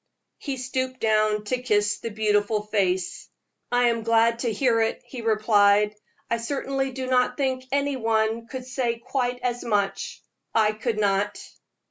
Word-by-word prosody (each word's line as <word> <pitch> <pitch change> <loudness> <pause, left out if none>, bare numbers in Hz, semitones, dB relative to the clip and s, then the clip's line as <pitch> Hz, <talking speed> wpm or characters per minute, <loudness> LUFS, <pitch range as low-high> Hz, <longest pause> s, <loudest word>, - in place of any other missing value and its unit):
He 275 -3 -4
stooped 260 0 -3
down 215 -1 +2
to 250 +4 -2
kiss 210 -4 +1
the 230 - -4
beautiful 210 0 +1
face. 190 -4 -1 0.4
"I 245 0 +4
am 230 -1 -1
glad 230 +1 +3
to 235 -2 0
hear 230 +1 +2
it," 225 - 0
he 250 - -8
replied. 210 -2 +3 0.3
"I 235 - 0
certainly 270 +2 -2
do 260 0 -4
not 255 -1 +2
think 260 -2 -1
any 280 0 0
one 225 -1 +1
else 230 - -16
could 260 -1 -6
say 250 -2 -1
quite 245 +1 -2
as 245 -1 -1
much. 205 -4 -1 0.3
I 215 -1 +4
could 215 +1 -3
not." 200 0 +1
230 Hz, 160 wpm, -25 LUFS, 210-255 Hz, 0.4 s, I